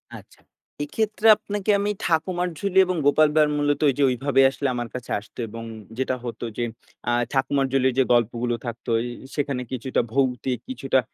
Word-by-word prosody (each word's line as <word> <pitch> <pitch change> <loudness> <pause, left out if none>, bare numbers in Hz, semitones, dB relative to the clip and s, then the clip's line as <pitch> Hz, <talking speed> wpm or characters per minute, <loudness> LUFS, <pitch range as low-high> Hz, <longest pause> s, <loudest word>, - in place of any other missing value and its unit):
আচ্ছা, - - -14 0.4
এক্ষেত্রে 215 +7 0
আপনাকে 205 0 -5
আমি 205 +1 0
'ঠাকুমার 175 +2 0
ঝুলি' 195 -1 +2
এবং 185 0 -1
'গোপাল 155 +2 +5
ভাঁড়' 150 -1 +4
মূলত 145 0 +1
ঐযে 140 +1 +1
ঐভাবে 135 +2 +2
আসলে 135 +1 -2
আমার 120 -1 -3
কাছে 125 -1 -6
আসত। 105 - -19
এবং 115 +1 -8 0.3
যেটা 130 0 0
হতো 120 0 -5
যে, 120 - 0 0.5
আ - - +2 0.2
'ঠাকুমার 135 +1 +1
ঝুলি'-র 130 -1 +2
যে - - +6
গল্পগুলো 120 +1 +1
থাকত, 120 -1 -6
ঐ - - +1 0.4
সেখানে 140 -3 -1
কিছুটা 130 0 0
ভৌতিক, 130 -1 0
কিছুটা 130 +1 +1
135 Hz, 165 wpm, -24 LUFS, 125-155 Hz, 0.5 s, যে